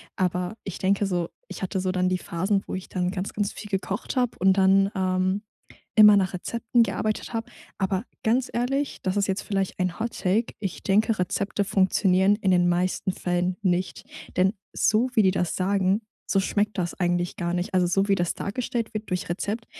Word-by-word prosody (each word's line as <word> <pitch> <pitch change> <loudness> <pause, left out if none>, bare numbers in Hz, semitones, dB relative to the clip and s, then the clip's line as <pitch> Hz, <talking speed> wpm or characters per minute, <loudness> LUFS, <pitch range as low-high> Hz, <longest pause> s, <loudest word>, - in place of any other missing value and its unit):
Aber 180 +2 -1
ich 195 - -6
denke 200 +2 +2
so 175 -3 -1 0.2
ich - - -8
hatte 190 0 -2
so 185 0 0
dann 185 0 +1
die 185 - +1
Phasen, 190 +4 -1
wo - - -6
ich 185 0 -5
dann 180 -1 -1
ganz, 190 +1 -4
ganz 205 -1 -2
viel 210 - -9
gekocht 195 +4 -3
hab 245 -2 +1
und 190 +1 +4
dann 195 +1 +4
ähm, 185 +1 0 0.5
immer 210 -1 +8
nach 190 -2 +1
Rezepten 235 +5 0
gearbeitet 215 +1 -1
hab. 225 - -4 0.3
Aber 190 0 0 0.2
ganz 240 +3 +2
ehrlich, 270 +4 -1
das 185 0 0
ist 200 -1 +1
jetzt 190 0 -1
vielleicht 195 -2 -2
ein 180 +2 -1
Hot 230 +1 -3
Take 210 +5 0
ich 195 -4 -4
denke, 215 +1 +2
Rezepte 200 +3 -1
funktionieren 190 0 +3
in 200 -3 0
den 175 -1 +4
meisten 180 +2 0
Fällen 180 0 -1
nicht. 185 -1 -1 0.3
Denn 190 +2 +3 0.2
so 235 +4 +2
wie 220 - +5
die 190 - +4
das 180 -2 -1
sagen, 195 +2 +1 0.3
so 195 - +2
schmeckt 205 +2 0
das 175 -1 -2
eigentlich 175 -1 0
gar 170 0 -2
nicht. 180 +1 -2
Also, 180 -1 +4
so 195 +3 +1
wie 200 - +4
das 175 -2 0
dargestellt 230 +2 -3
wird 215 -2 -5
durch 180 -2 -2
Rezept, 210 +6 -3
190 Hz, 195 wpm, -25 LUFS, 185-210 Hz, 0.5 s, immer